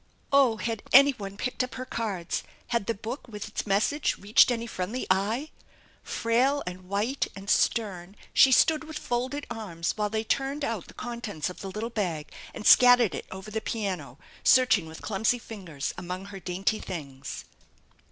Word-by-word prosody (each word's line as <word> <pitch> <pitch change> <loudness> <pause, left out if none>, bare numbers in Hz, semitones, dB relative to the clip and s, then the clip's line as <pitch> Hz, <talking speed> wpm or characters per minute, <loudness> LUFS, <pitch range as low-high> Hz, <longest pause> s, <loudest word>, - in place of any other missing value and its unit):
Oh, 265 -5 +5
had 225 -1 -3
anyone 245 -8 +5
picked 250 +2 -1
up 255 - -6
her 255 - -5
cards? 200 -9 -3 0.3
Had 235 -4 0
the 230 - 0
book 235 +7 -6
with 210 -3 -7
its 210 - -4
message 215 +9 +1
reached 205 +5 +5
any 235 -1 -1
friendly 220 +3 -4
eye? 220 +10 0 0.5
Frail 255 +5 +1
and 180 0 -8
white 215 +8 0
and 195 0 -9
stern 195 -4 0 0.2
she 270 - +7
stood 315 +5 +4
with 315 -1 -7
folded 260 +3 -2
arms 190 -8 -3
while 210 -1 0
they 220 +1 -1
turned 275 +5 -1
out 225 -8 -3
the - - -15
contents 230 -9 -4
of - - -12
the 195 - -5
little 215 +4 -4
bag 175 -9 -2 0.2
and 210 - -8
scattered 245 -5 +7
it - - -6
over 190 +3 -8
the 220 +1 -2
piano, 185 - -3 0.3
searching 250 -8 +5
1 - - -10
with 160 - -10
clumsy 220 +4 +1
finger* 195 -10 -10 0.2
among 180 +2 -5
her 200 -1 -8
dainty 190 +4 -1
things. 140 -6 -7
215 Hz, 170 wpm, -27 LUFS, 190-245 Hz, 0.5 s, she